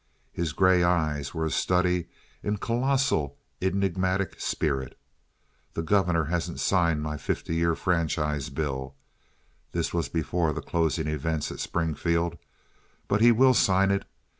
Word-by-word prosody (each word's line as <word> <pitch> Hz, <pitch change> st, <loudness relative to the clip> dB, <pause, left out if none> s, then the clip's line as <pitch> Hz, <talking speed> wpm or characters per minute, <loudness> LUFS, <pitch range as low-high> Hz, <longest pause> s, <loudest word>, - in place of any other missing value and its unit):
His 85 Hz, -2 st, -2 dB
gray 95 Hz, +2 st, +4 dB
eyes 80 Hz, -5 st, +1 dB
were 80 Hz, 0 st, -1 dB
a 80 Hz, -, -1 dB
study 90 Hz, -1 st, +1 dB, 0.3 s
in 105 Hz, 0 st, -1 dB
colossal 120 Hz, -, 0 dB, 0.2 s
enigmatic 95 Hz, 0 st, 0 dB
spirit. 65 Hz, -5 st, -1 dB, 0.8 s
"The 80 Hz, -, -2 dB
governor 90 Hz, -3 st, +2 dB
hasn't 85 Hz, +2 st, -2 dB
signed 85 Hz, -5 st, +2 dB
my 75 Hz, 0 st, -3 dB
fifty 80 Hz, -, -3 dB
year 85 Hz, 0 st, +2 dB
franchise 75 Hz, -5 st, 0 dB
bill" 65 Hz, -3 st, -3 dB, 0.8 s
(this -, -, -1 dB
was 85 Hz, -5 st, -1 dB
before 80 Hz, 0 st, 0 dB
the -, -, -4 dB
closing 80 Hz, -2 st, 0 dB
events 75 Hz, 0 st, -2 dB
at -, -, -8 dB
Springfield), 85 Hz, 0 st, -1 dB, 0.7 s
"but 105 Hz, -, +1 dB
he 120 Hz, +1 st, +8 dB
will 130 Hz, +3 st, +5 dB
sign 95 Hz, -3 st, +3 dB
it. 100 Hz, -, -1 dB
85 Hz, 135 wpm, -27 LUFS, 75-95 Hz, 0.8 s, he